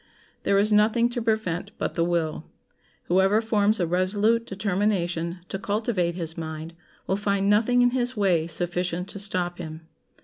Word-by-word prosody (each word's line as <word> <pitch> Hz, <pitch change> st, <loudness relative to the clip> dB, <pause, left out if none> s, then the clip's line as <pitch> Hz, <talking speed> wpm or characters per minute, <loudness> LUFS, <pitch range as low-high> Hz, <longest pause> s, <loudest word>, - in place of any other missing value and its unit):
There 200 Hz, -, +2 dB
is 210 Hz, +2 st, +3 dB
nothing 220 Hz, +3 st, +4 dB
to 240 Hz, -, -3 dB
prevent 220 Hz, -7 st, -1 dB
but -, -, -2 dB
the 165 Hz, -, +1 dB
will. 170 Hz, -2 st, -1 dB, 0.6 s
Whoever 190 Hz, +4 st, +3 dB
forms 215 Hz, -1 st, +2 dB
a 175 Hz, -, +2 dB
resolute 205 Hz, +7 st, +1 dB
determination 185 Hz, -3 st, -1 dB
to 195 Hz, -, -4 dB
cultivate 205 Hz, -5 st, -1 dB
his 165 Hz, -2 st, -4 dB
mind 160 Hz, 0 st, -6 dB, 0.3 s
will 190 Hz, -, 0 dB
find 200 Hz, -1 st, 0 dB
nothing 245 Hz, +4 st, +4 dB
in 245 Hz, -, +4 dB
his 250 Hz, -1 st, -1 dB
way 175 Hz, -6 st, +2 dB
sufficient 175 Hz, +2 st, -2 dB
to 200 Hz, -, -7 dB
stop 180 Hz, -3 st, -1 dB
him. 160 Hz, -2 st, -7 dB
195 Hz, 160 wpm, -25 LUFS, 175-215 Hz, 0.6 s, nothing